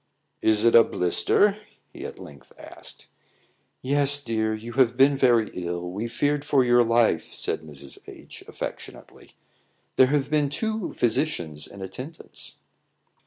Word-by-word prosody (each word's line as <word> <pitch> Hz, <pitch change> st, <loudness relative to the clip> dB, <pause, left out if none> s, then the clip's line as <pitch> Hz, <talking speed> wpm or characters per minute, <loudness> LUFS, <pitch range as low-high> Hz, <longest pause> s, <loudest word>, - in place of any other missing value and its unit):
"Is 110 Hz, 0 st, +3 dB
it 115 Hz, -, +5 dB
a 115 Hz, -, +9 dB
blister?" 200 Hz, -, +1 dB, 0.3 s
he -, -, -8 dB
at -, -, -11 dB
length 70 Hz, -1 st, -14 dB
asked. -, -, -13 dB, 0.8 s
"Yes, 140 Hz, +1 st, +3 dB
dear. 110 Hz, -2 st, -1 dB
You 115 Hz, +2 st, -8 dB
have 125 Hz, -2 st, +2 dB
been 140 Hz, +1 st, +5 dB
very 120 Hz, -5 st, +3 dB
ill; 90 Hz, 0 st, -4 dB
we 105 Hz, +5 st, -4 dB
feared 145 Hz, +5 st, -1 dB
for 140 Hz, -3 st, +3 dB
your 120 Hz, 0 st, +4 dB
life," 115 Hz, -8 st, +1 dB
said -, -, -2 dB
Mrs. 70 Hz, -3 st, -10 dB
H, -, -, -13 dB
affectionately; -, -, -9 dB, 0.6 s
"there 130 Hz, -, +7 dB
have 145 Hz, +1 st, 0 dB
been 150 Hz, -2 st, +2 dB
two 220 Hz, +5 st, -3 dB
physicians 100 Hz, -, -1 dB
in 100 Hz, -1 st, -10 dB
attendance." 130 Hz, -, -9 dB
120 Hz, 140 wpm, -25 LUFS, 100-140 Hz, 0.8 s, a